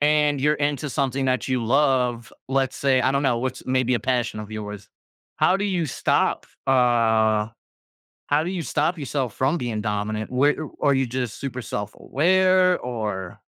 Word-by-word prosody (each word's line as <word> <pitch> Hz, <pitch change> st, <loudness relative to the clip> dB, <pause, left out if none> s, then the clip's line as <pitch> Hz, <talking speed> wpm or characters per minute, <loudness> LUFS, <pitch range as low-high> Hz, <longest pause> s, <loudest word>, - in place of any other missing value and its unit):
and 150 Hz, -1 st, +2 dB
you're 150 Hz, +2 st, +3 dB
into 145 Hz, -1 st, -1 dB
something 135 Hz, -1 st, -1 dB
that 130 Hz, -3 st, 0 dB
you 130 Hz, -3 st, -1 dB
love, 125 Hz, -3 st, +1 dB, 0.2 s
let's 135 Hz, -1 st, 0 dB
say, 135 Hz, -2 st, +2 dB
I 130 Hz, +2 st, +2 dB
don't 140 Hz, +1 st, +1 dB
know, 125 Hz, -4 st, +2 dB
what's 130 Hz, +1 st, -4 dB
maybe 130 Hz, -1 st, +1 dB
a 120 Hz, -, 0 dB
passion 120 Hz, -3 st, -1 dB
of 105 Hz, 0 st, -9 dB
yours? 105 Hz, -1 st, -7 dB, 0.5 s
How 185 Hz, -, +3 dB
do 200 Hz, -, -2 dB
you 180 Hz, -5 st, 0 dB
stop, -, -, 0 dB, 0.2 s
uh, 115 Hz, -4 st, +3 dB, 0.8 s
how 145 Hz, +2 st, +2 dB
do 175 Hz, -, -3 dB
you 185 Hz, -3 st, -3 dB
stop 155 Hz, +3 st, 0 dB
yourself 135 Hz, -4 st, -3 dB
from 135 Hz, +6 st, +1 dB
being 115 Hz, -5 st, -3 dB
dominant? 105 Hz, 0 st, -3 dB
Whe 140 Hz, +4 st, +3 dB
o 155 Hz, -, -6 dB
are 145 Hz, -1 st, +4 dB
you 135 Hz, -1 st, +1 dB
just 125 Hz, -2 st, -4 dB
super 130 Hz, -2 st, -4 dB
self-aware, 185 Hz, -, +2 dB
or 105 Hz, -7 st, -4 dB
130 Hz, 175 wpm, -23 LUFS, 115-145 Hz, 0.8 s, are